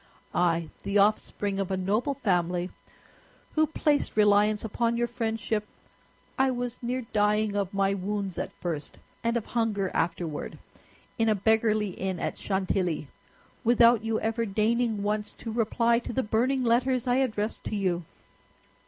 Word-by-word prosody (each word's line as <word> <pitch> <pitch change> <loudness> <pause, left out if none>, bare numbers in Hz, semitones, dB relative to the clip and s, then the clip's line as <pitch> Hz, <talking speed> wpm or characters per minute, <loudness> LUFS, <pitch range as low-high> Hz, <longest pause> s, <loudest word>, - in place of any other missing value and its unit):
I, 170 -2 +1
the 200 +1 0
offspring 200 -1 +1
of 195 - -1
a 190 - 0
noble 210 +9 0
family, 180 -6 0 0.8
who 310 0 +3
placed 295 -6 0
reliance 210 0 +4
upon 235 +2 0
your 240 - +2
friendship—I 225 +3 -3
was 245 -1 -3
near 250 +1 -2
dying 210 0 +2
of 200 -2 -1
my 195 0 +1
wounds 195 -1 -3
at - - -3
first, 160 -4 -5 0.3
and 230 +1 +1
of 225 - -3
hunger 215 -5 -1
afterward, 165 -2 -2 0.6
in 225 0 +3
a 215 - +3
beggarly 215 0 +2
inn 190 0 -3
at - - -3
Chantilly, 185 -6 -1 0.5
without 235 -1 +5
you 225 0 0
ever 225 +1 -1
deigning 220 +1 +1
once 210 0 -1
to 225 - -7
reply 230 +1 +2
to 240 - -6
the 260 - 0
burning 250 +5 +1
letters 245 +1 +2
I 250 0 +2
addressed 220 -5 -1
to - - -2
you." 180 -4 0
215 Hz, 145 wpm, -27 LUFS, 195-235 Hz, 0.8 s, without